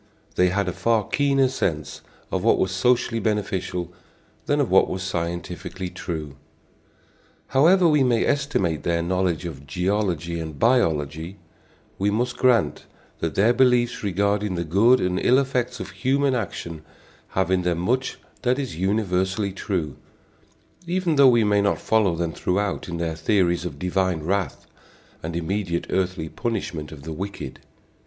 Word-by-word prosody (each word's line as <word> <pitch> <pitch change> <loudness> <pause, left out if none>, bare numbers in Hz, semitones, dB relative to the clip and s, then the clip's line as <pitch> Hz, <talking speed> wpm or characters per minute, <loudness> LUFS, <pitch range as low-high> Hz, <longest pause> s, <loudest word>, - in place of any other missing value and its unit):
They 90 0 +3
had 100 +1 0
a - - 0
far 110 +3 +1
keener 140 -2 +2
sense 80 - -2 0.3
of - - -1
what - - +4
was 95 - 0
socially 115 +4 +2
beneficial 95 -5 -2 0.5
than - - +2
of - - 0
what - - +5
was 95 0 -3
scientifically 90 +1 -4
true. 75 -5 -6 1.1
However 170 +7 +5
we 150 -3 +4
may 120 -3 +3
estimate 115 - 0
their 85 -1 0
knowledge 90 -1 0
of 70 -5 -7
geology 90 -2 -1
and 80 -3 -6
biology, 80 - +1 0.6
we 100 +2 +2
must 120 +4 0
grant 125 -4 +2 0.3
that 80 -1 -2
their 110 +5 +4
beliefs 125 -1 +3
regarding 100 0 0
the 85 - -1
good 105 +10 +4
and 90 0 0
ill 125 - +5
effects 130 -3 -1
of - - -6
human 135 +1 +1
action 85 -8 -4 0.6
have 95 0 +2
in 95 -1 +3
them 90 -1 0
much 125 +10 -1 0.2
that 125 0 +1
is 135 - -4
universally 95 0 0
true, 90 -6 -3 0.9
even 175 -2 0
though 140 -2 +7
we 120 -2 +4
may 105 -1 +3
not 100 - +1
follow 105 -6 +2
them 85 -1 -2
throughout 100 0 -1
in 85 - -3
their 85 -1 -2
theories 85 0 +1
of 70 -5 -5
divine 90 0 0
wrath 95 0 -2 0.6
and 80 +1 -5
immediate 85 0 -2
earthly 90 -3 -1
punishment 85 -7 -4
of 70 -3 -10
the 80 +1 -5
wicked. 95 -6 -6
95 Hz, 150 wpm, -24 LUFS, 85-115 Hz, 1.1 s, though